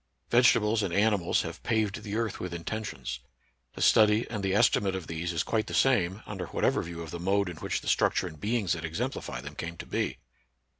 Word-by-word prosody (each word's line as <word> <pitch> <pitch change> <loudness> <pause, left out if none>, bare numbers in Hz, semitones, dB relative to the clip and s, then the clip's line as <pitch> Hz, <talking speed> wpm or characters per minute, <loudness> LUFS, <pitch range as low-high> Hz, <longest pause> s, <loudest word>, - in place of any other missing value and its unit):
Vegetables 115 -3 +4
and 100 - -1
animals 100 -2 +2
have - - -7
paved 110 -1 0
the 105 -1 -5
earth 115 -2 -1
with 90 -1 -5
inten 110 +6 -4
tions. 60 - -5 0.5
The - - -3
study 110 +1 +5
and 105 -3 -3
the 95 0 0
estimate 100 -1 +3
of 95 -3 -5
these 85 +2 -3
is 85 - 0
quite 110 -1 -1
the - - -4
same, 105 -6 +2
under 95 -4 -5
whatever - - +1
view 85 0 -6
of 80 - -9
the 85 - -5
mode 100 +2 +1
in 85 -3 -6
which - - -2
the - - -10
structures 90 - +2
and 80 - -15
beings 105 -4 +1
that 80 -2 -5
exemplify 80 -6 -3
them 70 +2 -8
came 85 +2 -6
to - - -7
be. - - -2
95 Hz, 215 wpm, -29 LUFS, 85-110 Hz, 0.5 s, study